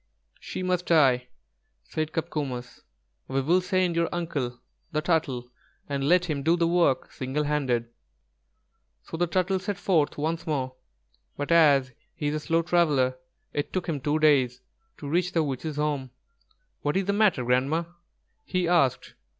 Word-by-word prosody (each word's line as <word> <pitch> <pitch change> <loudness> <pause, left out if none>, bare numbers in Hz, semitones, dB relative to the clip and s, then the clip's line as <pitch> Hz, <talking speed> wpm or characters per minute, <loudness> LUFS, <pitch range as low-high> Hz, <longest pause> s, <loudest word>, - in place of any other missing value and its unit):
"She 185 - -5
must 180 -1 0
die," 130 -7 +4 0.6
said 155 - -3
Copcomus; 145 -7 -4 0.5
"we 135 +1 0
will 170 +7 +3
send 185 -1 +1
your 170 0 +1
uncle, 145 -8 -3 0.3
the 155 - 0
Turtle, 140 -7 -1 0.4
and 140 0 -1
let 180 0 +4
him 150 -5 -2
do 165 +5 +3
the 170 -1 +2
work 170 -6 +2
single 135 +3 -2
handed." 135 -6 0 1.2
So - - -8
the 175 +2 +1
Turtle 185 +2 +1
set 195 +1 -3
forth 160 -7 +1
once 160 +3 -2
more; 130 -4 -1 0.6
but 145 +3 -3
as 140 -6 +5 0.2
he 145 - -1
is - - -2
a 155 - -1
slow 165 +2 +1
traveller, 150 -7 +2 0.4
it 145 - -2
took 185 -1 -2
him 150 -5 -2
two 145 +3 +1
days 135 -5 +3 0.4
to 145 - -7
reach 175 +4 0
the 165 - +2
witch's 145 +2 -3
home. 145 -3 -1 0.7
"What 145 +5 0
is 195 - 0
the 200 - +1
matter, 200 - +3
Grandma?" 135 +7 +2 0.6
he 180 -2 -1
asked. 165 -7 +2
155 Hz, 160 wpm, -26 LUFS, 135-170 Hz, 1.2 s, as